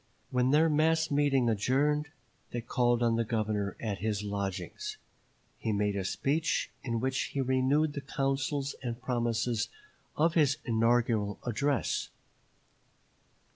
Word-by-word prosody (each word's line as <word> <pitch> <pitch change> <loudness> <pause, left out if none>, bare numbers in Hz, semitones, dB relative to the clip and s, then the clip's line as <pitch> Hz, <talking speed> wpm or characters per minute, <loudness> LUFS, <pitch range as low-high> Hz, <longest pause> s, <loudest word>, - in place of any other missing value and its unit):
When 125 0 +2
their 155 +4 +5
mass 160 +1 +2
meeting 140 -3 +3
adjourned, 140 +7 +2 0.4
they 120 - -3
called 120 0 +1
on 115 -1 +2
the 115 - +2
Governor 110 -3 -1
at 105 -3 -3
his 105 -1 -1
lodgings; 100 - -4 0.6
he 110 - -1
made 105 -1 +1
a 100 - -1
speech, 155 - 0
in 115 -3 -2
which 130 +2 0
he 140 - -4
renewed 135 +4 +2
the 140 - -4
counsels 135 0 -1
and 120 -2 -4
promises 120 -2 0 0.5
of 165 +2 +3
his 145 -5 +3
inaugural 115 -3 +2
address. 130 +3 0
125 Hz, 130 wpm, -30 LUFS, 110-145 Hz, 0.6 s, their